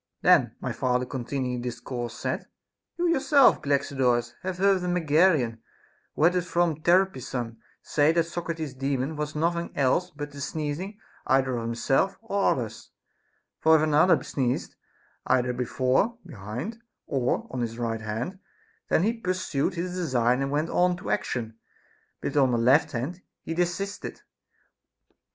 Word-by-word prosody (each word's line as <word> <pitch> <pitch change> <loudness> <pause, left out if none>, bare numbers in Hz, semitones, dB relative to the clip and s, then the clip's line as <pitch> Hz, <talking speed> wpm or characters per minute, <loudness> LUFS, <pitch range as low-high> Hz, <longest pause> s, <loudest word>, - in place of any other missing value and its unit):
Then - - +5
my - - -3
father 125 0 0
continu 130 +1 -3
ing 125 -1 -2
the 125 - -2
discourse 120 -1 -6
said: - - -3 0.5
You 350 0 +1
yourself, 285 -4 +5
Galaxidorus, 130 -4 +1
have 185 -1 -4
heard 195 0 +3
a 180 - -3
Megarian, 155 -8 +3 0.6
who - - 0
had 175 +3 +5
it 180 - +2
from 170 -3 0
Terpsion, 130 -10 +1 0.3
say 150 +1 +3
that 170 0 +3
Socrates's 165 -3 -4
Daemon 135 +2 -2
was 150 0 -4
nothing 170 +2 0
else 145 +7 +2
but 145 -3 -7
the 140 0 -9
sneezing 155 +8 -4 0.3
either 130 -1 +2
of 115 -1 -3
him 115 0 -2
self 135 +11 +1
or 200 -3 0
others; 115 -4 -6 0.7
for 160 0 +5
if 155 - +3
another 155 +4 +4
sneezed, 130 -3 -2 0.5
either 125 -1 +2
before, 130 - +1
behind 120 - -6
him, 230 - -22 0.2
or 130 -4 0
on 125 - -3
his 115 -1 -3
right 115 -2 -2
hand, 115 - -4 0.5
then 160 - +3
he 225 +3 +2
pursued 185 -6 -1
his 180 +1 -3
design 130 -8 +1
and 135 - -1
went 150 +3 -1
on 180 0 +2
to 180 - -5
action; 115 - -2 0.6
but - - -1
if 140 - -4
on 135 -3 +4
the 120 - +2
left 130 +8 +4
hand, 140 +10 -4 0.2
he 165 - -4
desisted. 180 +4 -3
145 Hz, 160 wpm, -26 LUFS, 125-180 Hz, 0.7 s, Then